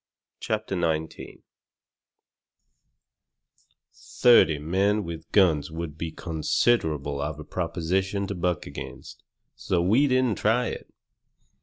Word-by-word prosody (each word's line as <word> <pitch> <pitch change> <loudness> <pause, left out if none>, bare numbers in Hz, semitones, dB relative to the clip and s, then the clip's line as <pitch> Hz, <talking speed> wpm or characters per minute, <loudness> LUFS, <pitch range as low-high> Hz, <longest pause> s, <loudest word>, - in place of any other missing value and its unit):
CHAPTER - - -3
XIX 80 -2 -3 2.5
Thirty 115 -10 +4
men 95 +7 0
with 85 -2 -8
guns 85 -8 +3
would 80 -2 -6
be 80 +1 -4
considerable 80 - 0
of 75 +1 -4
a - - -7
proposition 95 +6 -2
to 100 - -4
buck 90 -2 -2
against, - - -9 0.3
so 90 - -1
we 110 +12 +3
didn't 130 -4 +1
try 115 +3 +2
it. - - -8
85 Hz, 105 wpm, -26 LUFS, 80-100 Hz, 2.5 s, Thirty